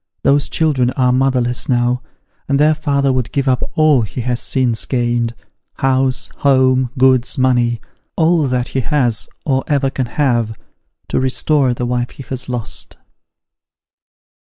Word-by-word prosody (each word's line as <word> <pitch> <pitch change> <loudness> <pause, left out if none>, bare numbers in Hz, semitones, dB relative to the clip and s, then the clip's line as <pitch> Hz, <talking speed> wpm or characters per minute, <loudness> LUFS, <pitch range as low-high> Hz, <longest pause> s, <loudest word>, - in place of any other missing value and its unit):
Those 140 0 +3
children 140 -6 +1
are 125 -1 +3
motherless 125 -2 0
now, 125 0 +1 0.5
and 140 0 +2
their 155 +1 +4
father 140 -3 0
woiilct 130 -2 -2
give 140 -1 -1
up 130 -2 +2
all 155 -5 +4
he 110 +3 -4
has 120 0 -2
since 125 -4 0
gained 120 -2 -1 0.4
house, 130 -1 0
home, 130 -2 +3
goods, 130 -1 +3
money: 120 -2 +2 0.4
all 165 -2 +2
that 125 -1 -1
he 135 - -2
has, 120 -5 0 0.2
or 135 -3 +1
ever 140 -2 +1
can 130 -2 -2
have, 120 -5 0 0.5
to - - 0
restore 130 0 +1
the 120 - -3
wife 120 0 -1
he 135 - -11
has 130 +1 -6
lost." 120 -3 -3
130 Hz, 145 wpm, -17 LUFS, 120-135 Hz, 0.5 s, their